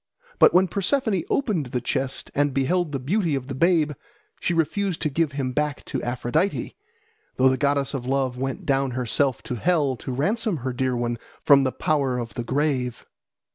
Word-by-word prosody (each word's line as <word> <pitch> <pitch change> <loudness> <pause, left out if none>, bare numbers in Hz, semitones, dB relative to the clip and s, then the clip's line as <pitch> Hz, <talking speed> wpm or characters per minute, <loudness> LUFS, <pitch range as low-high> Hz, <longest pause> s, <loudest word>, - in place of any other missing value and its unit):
But - - +8
when 185 +1 +4
Persephone 200 - 0
opened 205 - 0
the 125 0 -2
chest 130 +2 -2
and 145 -2 +1
beheld 160 +4 +1
the 140 - -1
beauty 165 - 0
of 135 -2 -3
the - - -3
babe, 160 +1 +3 0.5
she - - -1
refused 170 +2 0
to 155 - 0
give 155 0 0
him 135 -2 -2
back 150 +2 -2
to - - -3
Aphrodite, 120 +10 -1 0.6
though 130 +1 +5
the 130 - +2
goddess 140 0 0
of 125 -3 -4
love 135 -2 0
went 135 +1 -4
down 135 -1 +1
herself 130 +1 0
to 125 - -4
hell 150 -2 +2
to 130 - -6
ransom 200 - 0
her 130 - -1
dear 130 0 0
one 120 -1 -2 0.2
from 140 -1 +6
the 130 - +1
power 140 -4 0
of 115 -4 -5
the 120 - -4
grave. 130 -2 -1
140 Hz, 185 wpm, -24 LUFS, 130-165 Hz, 0.6 s, But